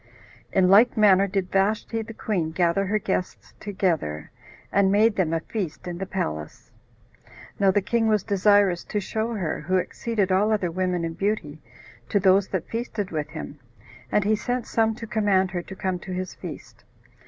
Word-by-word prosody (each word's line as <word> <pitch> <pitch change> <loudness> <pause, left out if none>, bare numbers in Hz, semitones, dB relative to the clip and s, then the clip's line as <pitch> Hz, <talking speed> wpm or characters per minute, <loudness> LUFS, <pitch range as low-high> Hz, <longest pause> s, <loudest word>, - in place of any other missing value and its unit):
In 185 -1 +3
like 215 +6 +5
manner 200 -2 +5
did 190 -2 -2
Vashti 210 +3 0
the 225 0 -9
queen 180 -9 -1
gather 175 +3 +1
her 210 +3 +1
guests 190 -3 -3
together, 165 - -2 0.4
and 195 -1 +3
made 215 +2 +4
them 175 -4 +1
a 165 -1 0
feast 185 -4 -5
in 175 0 -5
the 195 - -4
palace. 75 - -5 0.9
Now 195 - +4
the 195 +1 +2
king 225 +2 +1
was 215 -3 +2
desirous 200 -3 +3
to 210 - -2
show 220 +3 -3
her, 175 -7 -2
who 185 +1 +1
exceeded 205 +1 -1
all 200 +4 +3
other 195 -5 0
women 180 -1 -1
in 165 - -4
beauty, 165 -6 -2 0.5
to 205 - +2
those 190 0 +4
that 185 -4 -3
feasted 225 -4 -4
with 155 -2 -3
him, 145 - -8 0.5
and 210 - +3
he 215 +2 +2
sent 245 +3 -2
some 225 -1 +1
to 235 0 -7
command 200 -4 +1
her 175 -1 -2
to 190 - -10
come 185 -1 -2
to 185 - -9
his 185 0 -4
feast. - - -10
195 Hz, 180 wpm, -25 LUFS, 180-215 Hz, 0.9 s, like